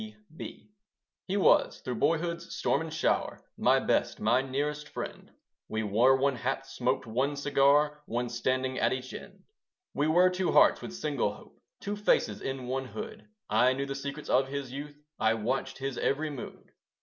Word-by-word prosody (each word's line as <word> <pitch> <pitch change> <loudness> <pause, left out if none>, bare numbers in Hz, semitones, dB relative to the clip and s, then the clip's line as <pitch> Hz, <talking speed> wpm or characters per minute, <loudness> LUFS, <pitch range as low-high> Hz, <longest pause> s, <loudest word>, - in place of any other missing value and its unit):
C.B. 210 -3 -10 0.6
He 195 +2 0
was, 195 - +4
through 125 - -3
boyhood's 170 +4 0
storm 155 -3 +1
and 160 -1 -5
shower, 160 - 0 0.2
My - - +4
best, - - 0
my 120 +4 +3
nearest 145 +3 -3
friend; - - -7 0.4
We 110 0 -2
wore 120 +6 +4
one 135 -1 +1
hat, 135 +3 -2
smoked 130 -1 -1
one 130 +6 0
cigar, 145 +1 +3
One 120 +1 -1
standing 130 +2 -1
at - - +2
each 130 0 -5
end. - - -10 0.5
We 145 - +1
were 180 +3 +5
two 185 -1 0
hearts - - +6
with 190 - -7
single 150 -7 -1
hope, - - -17 0.2
Two 205 +1 -3
faces 210 0 +1
in 135 -1 -4
one 130 +1 -2
hood; 210 +12 -8 0.2
I 130 +1 +4
knew 135 +1 -2
the 135 - -4
secrets 140 +2 -6
of 130 +1 +3
his 140 -2 -5
youth; 145 +2 -7 0.2
I 110 0 +3
watched 115 +5 -2
his 135 -2 -4
every 150 +2 0
mood. 135 -4 -9
140 Hz, 175 wpm, -29 LUFS, 130-150 Hz, 0.6 s, hearts